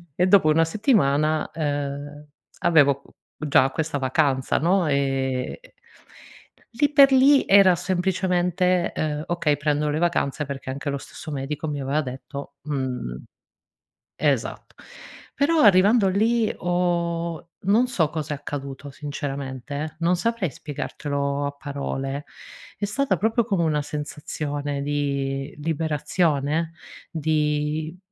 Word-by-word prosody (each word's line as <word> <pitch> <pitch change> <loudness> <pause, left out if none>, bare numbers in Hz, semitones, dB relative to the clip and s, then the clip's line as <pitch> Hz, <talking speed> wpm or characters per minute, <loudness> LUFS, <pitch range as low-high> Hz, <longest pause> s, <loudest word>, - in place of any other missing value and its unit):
e 180 - +2
dopo 190 -4 +5
una 165 +2 +4
settimana, 155 - +2
ehm, 145 -1 -4 0.3
avevo 140 -4 +4
qu - - -21 0.3
già 135 -2 +4
questa 160 -1 -2
vacanza, 135 0 +1
no, 175 +1 +2
ehm 135 -2 0 1.2
lì 290 +4 +2
per 275 -2 +7
lì 270 +2 +6
era 195 -2 +7
semplicemente, 180 -1 +1
uhm, 150 0 -2
"Okay 170 -4 0
prendono 150 0 0
le 150 - -1
vacanze," 155 -4 0
perché 135 -1 -6
anche 140 +2 -5
lo 140 - -1
stesso 155 +3 -9
medico 145 +2 -4
mi 145 -1 -3
aveva 140 +3 0
detto 140 +1 -7
mhmm, 130 - -4 0.9
esatt - - -1 0.6
però 310 +3 +2
arrivando 205 +1 +6
lì 220 +4 +2
ho 170 -1 -1
non 220 +6 +3
so 170 -11 +1
cosa 155 -1 -4
è - - -8
accaduto 140 0 -6
sinceramente, 140 0 -5
non 170 +2 +2
saprei 220 -1 -1
spiegartelo 140 -1 -3
a 140 - -3
parole, 140 0 -4 0.5
è 205 - -1
stata 270 +7 0
proprio 225 +2 +2
come 195 -6 0
una 150 -2 +1
sensazione 145 -1 -4
di 140 -1 -2
liberazione, 155 0 0 0.4
di 155 +1 -1
150 Hz, 120 wpm, -24 LUFS, 140-180 Hz, 1.2 s, per